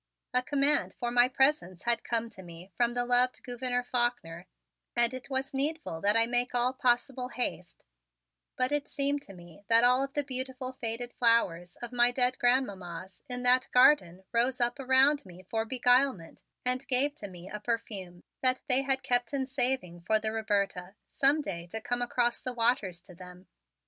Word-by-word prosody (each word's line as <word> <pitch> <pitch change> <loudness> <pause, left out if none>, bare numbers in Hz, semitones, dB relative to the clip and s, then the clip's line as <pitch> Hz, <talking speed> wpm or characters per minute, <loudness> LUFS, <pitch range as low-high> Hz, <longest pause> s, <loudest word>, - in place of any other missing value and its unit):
A 250 - +5
command 285 +2 +1
for 240 -1 -2
my 245 0 +5
presence 265 - +1
had 235 0 +2
come 230 -1 -2
to 190 - -12
me 175 +1 -12
from 240 0 0
the 245 0 0
loved 250 +1 +2
Gouverneur 245 0 -2
Faulkner 240 -9 -2 0.5
and 240 +1 +3
it 255 +1 -8
was 270 0 -3
needful 280 - -3
that 205 +2 +3
I 230 - +4
make 245 +1 0
all 245 +1 +1
possible 250 0 0
haste; 245 -8 -3 0.7
but 255 +1 0
it 290 -1 -1
seemed 285 0 -1
to 200 - -14
me 175 0 -15
that 230 +1 +5
all 250 +2 +4
of 275 0 -6
the 290 - 0
beautiful 260 -1 -5
faded 240 -1 -4
flowers 180 -8 +1
of 240 - -5
my 240 0 +4
dead 250 0 0
grandmammas 190 -8 -1
in 250 0 -4
that 255 +1 +4
garden 190 - +4
rose 240 +2 +1
up 240 +2 0
around 270 +2 +3
me 185 -1 -14
for 225 0 -1
beguilement 245 -6 +1 0.2
and 250 +1 0
gave 270 +3 +2
to 205 - -7
me 180 -1 -12
a 210 - -7
perfume 200 -6 -5 0.2
that 255 0 +2
they 260 -1 +3
had 270 -1 0
kept 245 +2 0
in 265 -1 -1
saving 255 -10 -2
for 215 +5 +1
the 215 0 -3
Roberta, 200 -4 -2 0.2
some 285 +3 +3
day 170 -7 -6
to 220 +6 -5
come 245 +2 -2
across 240 0 0
the 255 - -3
waters 230 -7 0
to 180 - -14
them. 180 +1 -13
245 Hz, 185 wpm, -29 LUFS, 200-255 Hz, 0.7 s, A